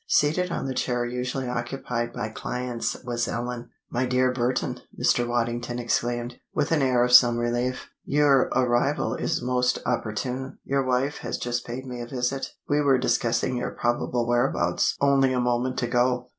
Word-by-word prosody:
Seated 160 +5 +2
on - - -2
the 135 - -2
chair 125 -1 -1
usually 125 +2 -3
occupied 120 -1 -3
by 105 - -4
clients, 125 +2 -3
was 120 -1 -1
Ellen. 120 0 -4 0.2
"My 125 +1 0
dear 125 0 +2
Burton," 125 0 -1 0.2
Mr. 120 0 +2
Waddington 120 0 -1
exclaimed, 120 0 -1 0.2
with 150 +1 0
an 160 -3 +3
air 125 -2 +3
of 125 - +1
some 120 -1 +7
relief, 120 +2 -1 0.2
"your 140 -2 +3
arrival 125 0 +1
is 125 - -1
most 125 0 +1
opportune! 125 +3 -2
Your 135 0 0
wife 130 +3 0
has - - -3
just 120 0 -3
paid 125 +2 -5
me 125 -2 -6
a 120 - -6
visit. 130 +1 -2 0.2
We 145 0 +2
were 140 -2 +4
discussing 120 0 +1
your 125 - -2
probable 120 0 0
whereabouts 120 0 +1
only 135 -2 +3
a 125 - +1
moment 125 +1 0
ago." 125 +1 +1
125 Hz, 165 wpm, -25 LUFS, 120-130 Hz, 0.2 s, some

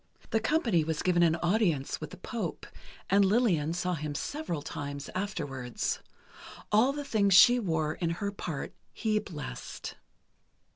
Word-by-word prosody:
The 225 - +3
company 220 - +2
was 160 -1 -2
given 175 -1 +3
an 165 -1 +4
audience 175 -7 +1
with - - -5
the - - -11
Pope, - - -4 0.4
and 200 +1 +5
Lillian 190 -7 +2
saw 180 +1 -1
him 150 -2 -4
several 170 - -3
times 140 -1 -5
afterwards. 145 - -3 0.7
All 220 +6 +5
the 290 0 -5
things 200 -6 +3
she 245 +6 +8
wore 160 -7 0
in 170 +1 -2
her 200 +1 -2
part 175 -7 -5 0.2
he 215 -2 +1
blessed. 150 - -7
180 Hz, 145 wpm, -30 LUFS, 155-215 Hz, 0.7 s, she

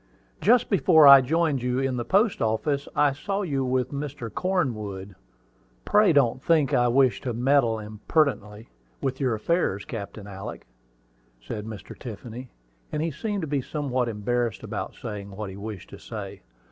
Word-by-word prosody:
"Just 245 +3 +4
before 170 -5 +6
I 140 -1 +10
joined 155 0 +1
you 125 0 -1
in 135 -1 0
the 120 - -2
post 200 - +2
office, 140 +6 0
I 145 -2 +3
saw 195 +8 -3
you 140 -7 -1
with 130 0 0
Mr. 140 -5 -5
Cornwood. 110 - -2 0.7
Pray 210 -2 +4
don't 130 -4 +2
think 155 -5 +2
I 120 0 +4
wish 130 +1 +3
to 125 -3 -3
meddle 125 -2 +2
impertinently 110 0 -1 0.3
with 130 -1 -2
your 130 -5 +1
affairs, 110 - 0
Captain 100 -2 -7
Alick," 100 -1 -8 0.7
said 105 - -6
Mr. 105 -4 -9
Tiffany; 120 +2 -8 0.4
and 150 - -1
he 165 - -1
seemed 205 +6 -3
to 160 - -3
be 140 -1 0
somewhat 130 -4 -2
embarrassed 115 0 -2
about - - -5
saying 105 -2 -7
what 100 0 -6
he - - -9
wished 100 -1 -8
to - - -10
say. - - -8
130 Hz, 160 wpm, -25 LUFS, 110-150 Hz, 0.7 s, I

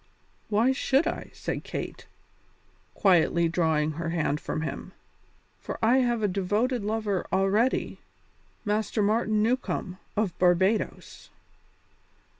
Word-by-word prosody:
"Why 220 +5 +3
should 270 +3 +2
I?" 335 - -3
said - - -4
Kate, - - -6 0.9
quietly 170 -3 +3
drawing 160 -2 +1
her 165 +2 -4
hand 155 -3 0
from 155 - -4
him, - - -6 0.7
"for - - -6
I 235 +4 +4
have 240 -3 +1
a - - +4
devoted 205 +6 0
lover 210 -3 -1
already 200 +6 +1 0.7
Master 210 +1 0
Martin 215 0 +2
Newcombe, 220 -6 -1 0.2
of 205 -5 0
Barbadoes." 185 +4 +1
205 Hz, 110 wpm, -27 LUFS, 175-225 Hz, 0.9 s, I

